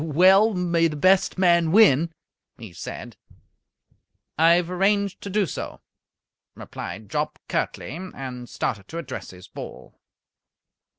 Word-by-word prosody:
"Well, 190 +7 +5
may 170 -2 +2
the 155 - -5
best 185 +6 +3
man 170 -3 +3
win," 170 -6 +5 0.5
he 110 -7 -11
said. 85 - -8 1.2
"I 165 +2 +5
have 175 0 +1
arranged 200 +1 +1
to 200 - -6
do 205 +1 +1
so," - - -6 0.8
replied 105 +4 -8
Jopp, - - -2
curtly, 145 - -3 0.2
and 125 -2 -7
started 100 -3 -3
to 165 - -7
address 140 -6 -6
his 90 0 -13
ball. - - -10
170 Hz, 125 wpm, -24 LUFS, 130-190 Hz, 1.2 s, Well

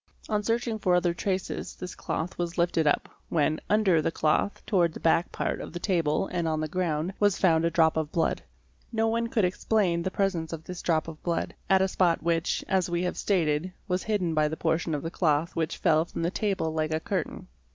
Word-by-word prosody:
On 210 -1 +1
searching 230 +1 -1
for 180 -3 +3
other 175 -1 +2
traces 190 +1 -3
this 180 -1 -7
cloth 165 +3 -4
was 175 0 -2
lifted 170 -2 +2
up, 145 - +2 0.2
when, 155 -1 +1
wnder 200 -6 +4
the - - 0
cloth 160 +5 0
towards 175 -6 +2
the - - -6
back 165 +1 +2
part - - -2
of - - -8
the 175 - -4
table 170 -4 +1
and 170 -2 0
on 155 -1 0
the 155 - -1
ground, 170 0 -1
was 205 -2 +3
found 165 -3 +3
a - - +3
drop 160 -1 +3
of 155 -1 -1
blood. 165 - 0 0.5
No 225 -1 +1
one 230 +1 0
could 225 -4 +1
explain 180 -1 +1
the 185 - -1
presence 185 -5 -1
of 160 -1 -6
this 180 +1 -7
drop 160 -2 +1
of 160 -2 -9
blood, 170 -1 -2 0.2
at 190 -1 +5
a - - +2
spot 180 -3 +1
which, 165 0 0
as 185 -2 +1
we 175 +1 0
have 180 - -1
stated, 170 -2 0
was 180 -1 0
hidden 195 -6 0
by 155 -1 +3
the 160 +1 -4
portion 160 -1 0
of 145 - -4
the 165 - -4
cloth 160 -2 +1
which 160 -1 -1
fell 160 -2 +3
from 165 - -5
the 170 - 0
table 195 -7 -1
like 155 0 -1
a 155 - +1
cur - - -1
tain. - - -11
170 Hz, 225 wpm, -27 LUFS, 160-190 Hz, 0.5 s, at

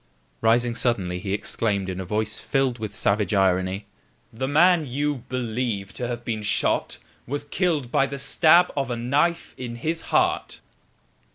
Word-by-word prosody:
Rising 120 +1 +3
suddenly 95 -8 0
he 95 +1 -5
exclaimed 100 -1 0
in 95 0 -4
a 95 - -4
voice 110 +3 0
filled 135 -3 0
with 105 -2 -5
savage 105 -1 +1
irony: 95 +1 +1 0.5
"The 130 +4 -3
man 165 +2 +4
you 140 0 -2
believe 115 -5 -3
to 120 - -4
have 120 -1 -5
been 110 -2 -2
shot 105 - 0 0.3
was 145 +3 -3
killed 145 -4 -1
by 135 - +3
the 140 +1 -6
stab 170 +5 +4
of 135 -2 -1
a 120 - -2
knife 140 +8 0
in 120 -2 -5
his 160 +7 -2
heart!" 365 0 +1
120 Hz, 160 wpm, -24 LUFS, 105-145 Hz, 0.5 s, man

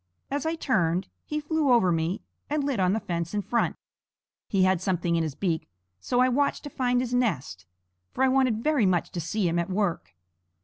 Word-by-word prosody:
As 285 +2 -1
I 325 - 0
turned, 185 - 0 0.2
he 300 - -2
flew 300 -2 +1
over 230 -7 +5
me 165 +4 -1 0.3
and 295 0 0
lit 275 -6 -1
on 185 0 +3
the 220 - +1
fence 170 -1 -3
in 205 - 0
front. 235 - 0 0.7
He 195 -2 +2
had 185 -2 +3
something 175 -2 0
in 165 - +2
his 155 -4 -3
beak; 170 -5 -2 0.3
so 245 - +1
I 255 - +5
watched 280 +3 +1
to 290 - -7
find 250 -1 +1
his 250 -1 -3
nest; 155 - -1 0.4
for 265 - 0
I - - +5
wanted 255 -4 +2
very 295 -9 +3
much 180 -2 +1
to 175 - -3
see 185 +4 -1
him 170 +1 +1
at 170 - -2
work. 185 - -1
205 Hz, 210 wpm, -27 LUFS, 170-255 Hz, 0.7 s, over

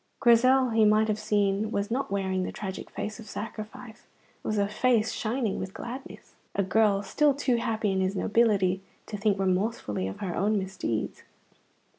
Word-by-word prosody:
Grizel, 255 +1 +5
he 220 0 +4
might 215 +1 +4
have 215 0 0
seen, 210 -1 +1
was 205 0 -2
not 270 +3 -1
wearing 190 -1 -1
the 185 - -3
tragic 190 -2 -6
face 215 +2 -5
of 215 -3 -10
sacrifice; 220 +2 -8 0.4
it - - -6
was 215 - 0
a 200 0 +2
face 225 +1 +2
shining 225 -2 -1
with 190 0 -6
gladness, 255 +3 -8 0.2
a 200 - +2
girl 205 +1 +2
still 290 +7 +2
too 260 -3 +1
happy 220 -3 0
in 190 0 0
his 190 +1 0
nobility 195 -4 +2 0.2
to 215 - -6
think 205 -1 +1
remorsefully 185 - -1
of 95 - -6
her 185 -4 -3
own 210 +3 +1
misdeeds. 185 - -3
210 Hz, 175 wpm, -28 LUFS, 195-230 Hz, 0.4 s, Grizel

